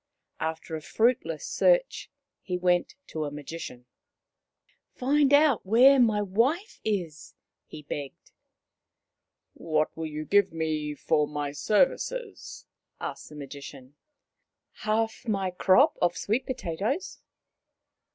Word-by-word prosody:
After 160 0 -4
a 155 - -5
fruitless 220 -5 0
search - - +2 0.3
he 180 -1 -3
went 180 -1 +1
to 155 - -4
a - - -3
Magician. 145 -3 -8 0.6
" - - -43
Find 280 +2 +3
out 285 -4 +5
where 255 +7 +6
my 215 -4 +3
wife 255 - 0
is," 175 -8 -3 0.3
he 150 - -10
begged. 140 -1 -7 0.7
" - - -59 0.2
What 155 -2 -1
will 160 0 -4
you 155 0 -5
give 200 +3 +3
me 155 -2 -2
for 150 0 +1
my 145 -1 -3
services? 275 - -1 0.3
M - - -3
asked - - -13
the 150 - -12
Magician. 140 -2 -10 0.4
" - - -57
Half 225 +2 -1
my 195 -4 0
crop 215 - +4
of 175 0 +2
sweet 235 +6 -1
potatoes." 250 - -3
180 Hz, 125 wpm, -27 LUFS, 155-245 Hz, 0.7 s, where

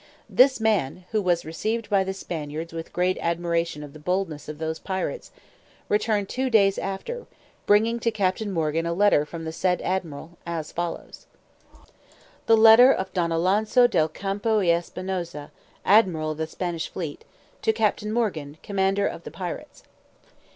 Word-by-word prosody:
This 260 0 +4
man 185 -7 0
(who 215 -1 +1
was 175 -3 +1
received 215 +8 -3
by 200 -2 +3
the 190 0 -4
Spaniards 160 -2 -5
with 165 0 -6
great 180 +1 0
admiration 170 -2 -1
of 145 -1 -10
the 155 - -11
boldness 165 -2 -2
of 150 - -6
those 160 0 -3
pirates) 190 - -4 0.6
returned 210 -1 +1
two 260 +4 -1
days 200 -4 +4
after, 335 - -5 0.4
bringing 225 +3 +3
to 230 - +1
Captain 205 -1 -1
Morgan 165 -1 0
a 170 - 0
letter 190 -6 +3
from 165 +1 -7
the 160 - -3
said 180 +2 0
admiral, 170 -2 -4
as 165 -3 -4
follows: 175 0 -5 1.2
_The 225 - +6
Letter 225 +4 +8
of 190 -7 -2
Don 170 -3 0
Alonso 205 +8 +3
del 160 -10 +2
Campo 200 +6 -1
y 190 -4 +2
Espinosa, 175 -2 -3 0.3
Admiral 180 -7 +4
of 155 - -7
the 160 - -1
Spanish 170 -1 -4
Fleet, 160 -5 -6 0.4
to - - +3
Captain 215 -1 0
Morgan, 165 -11 -2
Commander 195 -1 +1
of - - -4
the - - -7
Pirates. - - -7
185 Hz, 160 wpm, -25 LUFS, 165-210 Hz, 1.2 s, Letter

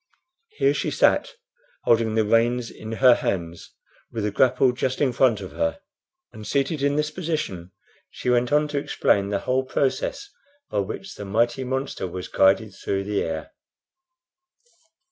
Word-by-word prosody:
Here 410 0 +3
she - - -1
sat, - - +2 0.5
holding 115 -1 +2
the 110 -1 +2
reins 115 +2 +2
in 110 +1 -8
her 125 +2 +6
hands, 85 -6 -3 0.4
with 110 - -3
the 105 - 0
grapple 130 +4 +3
just 130 +1 -2
in 135 -4 +2
front 120 -3 +3
of - - -7
her; 290 0 -1 0.5
and, 105 -1 -9
seated 140 +4 0
in 140 0 +2
this 150 +1 0
position, 150 - -4 0.4
she - - -8
went 125 +1 +2
on 150 +1 +3
to 145 -1 -1
explain 100 -7 +1
the 100 - 0
whole 130 +1 0
process 405 - -2 0.4
by - - 0
which 190 - -5
the - - -8
mighty 120 +6 +1
monster 130 -6 -3
was 90 +1 -6
guided 100 +2 +3
through 100 0 -3
the 100 0 -1
air. 80 -1 -4
120 Hz, 160 wpm, -24 LUFS, 105-140 Hz, 0.5 s, her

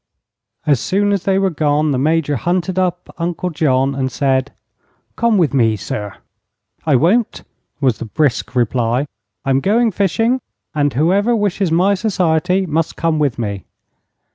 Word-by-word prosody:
As 145 -5 +3
soon 205 - 0
as 200 -3 -1
they 195 -1 +2
were 195 -1 +1
gone 150 -1 +1
the 130 - 0
Major 150 0 +1
hunted 180 - -1
up 180 -1 -2
Uncle 175 +1 -2
John 135 -3 +1
and 130 -1 -2
said: 135 0 0 0.6
"Come 235 -2 +2
with 165 -6 +2
me, 115 -5 +3
sir." 105 0 -5 0.7
"I 150 - +4
won't," 195 - +1 0.4
was 130 -6 +1
the - - -5
brisk 135 +4 -1
reply; 120 +2 +1 0.4
"I'm 135 0 +2
going 225 - +2
fishing, 225 +7 +1 0.3
and 145 -2 +1
whoever 195 - +2
wishes 200 -4 0
my 185 +5 +3
society 185 -2 +1
must 160 -1 -1
come 165 -2 0
with 145 -5 0
me." 100 -5 -4
160 Hz, 150 wpm, -17 LUFS, 135-190 Hz, 0.7 s, I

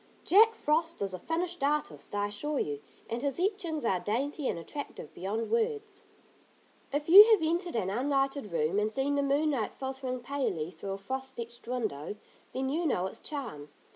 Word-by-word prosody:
Jack 445 +5 +6
Frost 330 -1 0
is 195 -1 -2
a 185 - -5
finished 340 - -2
artist, 295 -6 -1
I 205 0 +1
assure 295 +9 -2
you, 145 - -2 0.3
and 230 +1 -3
his 280 0 -1
etchings 355 - -1
are 185 -5 +2
dainty 270 - -1
and - - -1
attractive 170 - -7
beyond 210 +5 -3
words. 440 -2 -1 0.9
If 290 +1 -1
you 385 +5 +12
have 425 -7 +5
entered 340 +1 0
an 190 -4 0
unlighted 270 0 0
room, 165 +4 +1
and 210 +1 0
seen 270 +4 0
the 285 - +2
moonlight 280 -4 +1
filtering 265 -1 -4
palely 240 - -2
through 195 +1 -6
a - - -4
frost 265 +5 -5
etched 235 +1 -8
window; 215 - -3 0.4
then 265 +1 -2
you 325 +4 0
know 185 -10 +1
its 190 - -6
charm. 225 - -5
270 Hz, 175 wpm, -30 LUFS, 210-315 Hz, 0.9 s, you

